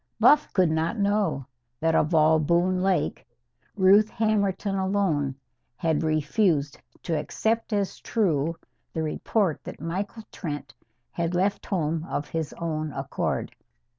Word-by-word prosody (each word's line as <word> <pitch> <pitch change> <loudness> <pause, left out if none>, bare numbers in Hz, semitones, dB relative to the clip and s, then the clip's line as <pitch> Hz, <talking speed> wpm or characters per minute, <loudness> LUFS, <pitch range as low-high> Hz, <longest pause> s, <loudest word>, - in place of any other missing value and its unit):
Buff 300 0 +5
could 180 -5 +3
not 160 +7 0
know 200 -9 +1 0.3
that 165 0 +2
of 160 +1 +2
all 160 0 +5
Boone 175 +4 +2
Lake, 190 0 0 0.5
Ruth 200 +2 +5
Hammerton 205 -3 0
alone 190 -8 0 0.4
had 160 +4 0
refused 155 -1 +1 0.2
to 165 - -1
accept 225 +9 -1
as 200 -2 -1
true 165 -8 0 0.4
the 160 - -1
report 170 +2 0
that - - -8
Michael 195 +8 -4
Trent 150 -5 -6 0.4
had 170 +1 -2
left 195 +3 0
home 165 -4 -1
of 145 - -3
his 160 -2 -3
own 155 -2 -3
accord. - - -3
170 Hz, 130 wpm, -26 LUFS, 155-200 Hz, 0.5 s, Buff